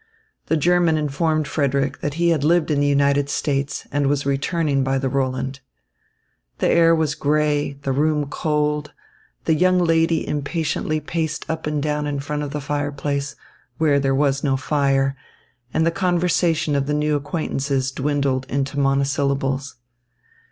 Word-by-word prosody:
The 160 - +2
German 170 0 +3
informed 155 +1 0
Frederick 140 -2 0
that 145 -1 -3
he 170 +1 +2
had 160 -4 +1
lived 165 +1 +2
in 145 - +2
the 145 - +2
United 140 0 +2
States 140 -1 -2
and 145 -1 +1
was 140 0 0
returning 140 0 0
by 135 0 0
the 135 0 -1
Roland. 130 0 -2 1.0
The - - +1
air 165 0 +5
was 160 -2 0
grey, 150 -1 +1
the 135 - -1
room 150 +2 +1
cold, 150 0 -1 0.5
the - - +3
young 185 +3 +3
lady 165 -2 +2
impatiently 155 +1 -1
paced 160 +1 -3
up 160 -1 -3
and 150 -1 -1
down 150 -1 -1
in 145 -1 -2
front 150 +1 -3
of 145 - -3
the 145 +1 -4
fireplace, 145 0 -2 0.4
where 145 -2 +3
there 135 -1 +1
was 140 -1 +1
no 135 -3 +1
fire, 135 -1 +1 0.6
and 160 +1 +1
the 165 - +3
conversation 175 -4 +1
of 140 0 0
the 150 - 0
new 150 0 +1
acquaintances 140 -2 -2
dwindled 135 -1 -1
into 140 +1 -2
monosyllables. 135 0 0
145 Hz, 155 wpm, -21 LUFS, 140-155 Hz, 1.0 s, air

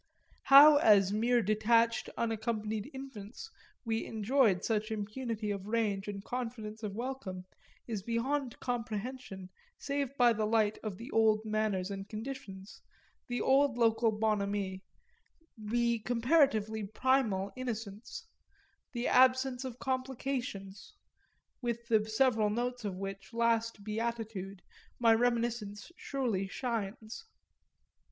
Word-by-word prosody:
How 290 +2 +9
as 205 -7 +5
mere 235 +2 +2
detached 230 +3 +2
unaccompanied 220 -1 -2
infants 265 - -9 0.3
we 225 0 -1
enjoyed 220 -3 +2
such 215 -1 0
impunity 220 0 -3
of 200 -1 -5
range 210 -3 0
and 200 -1 -5
confidence 230 -3 -5
of 205 -3 -5
welcome 230 -7 -5 0.4
is 220 -4 -3
beyond 240 +4 -2
comprehension 230 -4 -5 0.3
save 280 -1 -3
by 240 -1 +5
the 215 -1 -1
light 215 -1 +2
of 210 -4 -5
the 235 +6 -9
old 220 -1 +3
manners 210 -3 -1
and 195 0 -6
conditions, 215 -4 -8 0.5
the 245 -1 -2
old 270 -2 +3
local 225 -1 +3
bonhomie, 205 -3 -1 0.7
the 235 +1 0
comparatively 230 -3 +2
primal 215 -4 +1
innocence, 225 -3 -6 0.7
the 240 0 -2
absence 260 0 +4
of 255 -2 -6
complications; 255 -7 -4 0.7
with 235 -1 -3
the 220 -1 +2
several 220 -2 +3
notes 245 +3 -2
of 200 -3 -3
which 195 +3 -7
last 230 -2 +1
beatitude 215 -3 -4 0.3
my 230 -2 +5
reminiscence 235 -1 -1
surely 235 - -2
shines. 225 - -4
225 Hz, 115 wpm, -32 LUFS, 210-245 Hz, 0.7 s, How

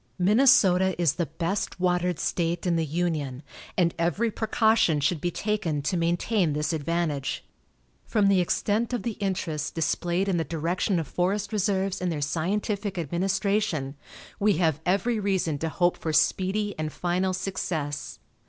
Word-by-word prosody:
Minnesota 190 -3 +4
is 170 -5 +3
the 170 -3 -2
best 170 +6 -3
watered 180 -1 +1
state 170 +2 -1
in 175 -2 +2
the 165 -1 0
Union, 155 -4 -2 0.3
and 170 -2 +3
every 185 +7 +1
precaution 220 -6 +2
should 145 +2 0
be 175 - 0
taken 205 -5 -1
to 165 - 0
maintain 175 +1 +1
this 150 +2 -1
advantage. 155 -2 -2 0.6
From 210 -3 +2
the 195 -1 +4
extent 215 +6 0
of 240 -6 -2
the 235 - -1
interest 170 -6 -2
displayed 175 +3 0
in 190 -3 +1
the 165 - +1
direction 170 +4 -1
of 160 - -4
forest 200 +4 -1
reserves 195 -2 0
and 180 -1 0
their 155 - -2
scientific 195 +6 -2
administration, 175 -2 -1 0.4
we 210 0 +4
have 160 -3 +1
every 215 +5 +1
reason 190 -7 0
to 160 - -1
hope 175 +2 +1
for 160 - -3
speedy 190 +6 +1
and 155 -1 -2
final 180 +3 0
success. 180 -6 -3
180 Hz, 155 wpm, -26 LUFS, 160-200 Hz, 0.6 s, Minnesota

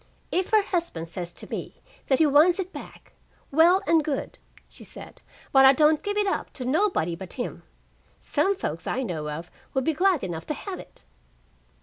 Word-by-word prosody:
"If 370 +1 0
her 430 -2 +4
husband 340 - -2
says 175 +1 -6
to - - -11
me - - -6 0.3
that 265 - +3
he 320 - +5
wants 305 +5 +5
it 380 -1 -4
back, - - -11 0.4
well 345 +6 +5
and 325 -2 +4
good," 285 -3 -3 0.3
she - - -12
said, - - -9 0.3
"but 270 -1 +6
I 265 0 +9
don't 305 +2 +4
give 410 0 -2
it 415 - +2
up 390 - -2
to 255 - -6
nobody 265 - +1
but 185 +1 -8
him. 245 - -5 0.6
Some 395 +1 +1
folks 385 - -4
I 265 - -1
know 160 -9 -4
of 165 +4 -6 0.2
would 265 - +2
be 320 - +1
glad 365 0 +2
enough 170 -3 -5
to 300 - -2
have 390 +3 -6
it." - - -13
300 Hz, 195 wpm, -26 LUFS, 230-365 Hz, 0.6 s, I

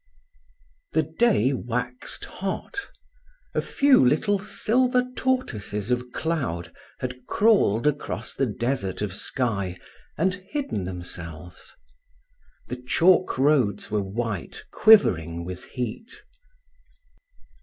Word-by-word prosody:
IX - - -38
The 160 - -21
day 175 - +4
waxed 125 0 -4
hot. 195 - -5 0.6
A - - +1
few 280 - +4
little 195 +10 +3
silver 250 +5 +1
tortoises 115 - -1
of 125 0 -1
cloud 120 - -2 0.3
had 125 0 -5
crawled 195 - +3
across 150 -1 -1
the 135 - 0
desert 115 -3 -2
of 100 -4 -3
sky, 100 -5 -2 0.4
and 185 +4 +2
hidden 190 - -4
themselves. 90 -2 -8 0.9
The 125 - -4
chalk 170 +8 +3
roads 130 -8 +2
were 105 -1 +1
white, 100 0 -4
quivering 85 - +5
with 90 0 -7
heat. 125 - -5
125 Hz, 100 wpm, -25 LUFS, -, 0.9 s, quivering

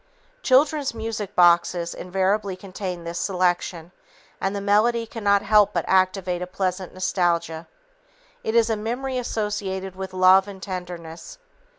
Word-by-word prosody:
Children's 280 - +2
music 220 -3 -5
boxes 175 0 +3
invariably 190 +2 -1
contain 185 -2 -6
this 170 +1 -5
selection, 180 -2 -1 0.5
and 195 +1 -1
the - - -2
melody 215 +4 +2
cannot 205 -3 +1
help 210 -1 +4
but - - -1
activate 185 -1 +1
a 180 - -4
pleasant 185 0 -3
nostalgia. 170 -3 -1 0.8
It 220 - -2
is 230 -1 +4
a - - +1
memory 250 +5 -3
associated 195 -5 -3
with 190 0 -6
love 185 +1 +5
and 200 -1 -9
tenderness. 175 - -7
190 Hz, 130 wpm, -23 LUFS, 180-210 Hz, 0.8 s, love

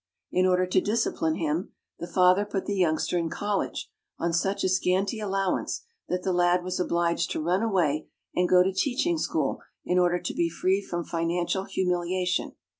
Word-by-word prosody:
In 185 +1 +3
order 185 0 +3
to 185 +1 +2
discipline 205 -7 0
him, 160 +3 -2 0.3
the 170 - -5
father 180 +2 +4
put 205 -2 -3
the 205 - -2
youngster 175 -1 +1
in 165 -1 -1
college 205 +3 -2 0.3
on 170 0 -1
such 195 +4 0
a - - +3
scanty 190 +3 +1
allowance 195 -2 -1 0.3
that 180 0 -1
the 190 - 0
lad 175 0 +3
was 185 0 -3
obliged 170 -1 +1
to - - -2
run 175 +5 +1
away 175 -9 +1 0.3
and 180 0 +1
go 180 0 +6
to 190 +1 0
teaching 280 - 0
school - - -1 0.2
in 180 +1 +2
order 175 0 +3
to - - -4
be 170 -1 +1
free 185 +4 +1
from 175 -3 -4
financial 175 +3 -1
humiliation. 180 0 -1
180 Hz, 180 wpm, -27 LUFS, 175-195 Hz, 0.3 s, go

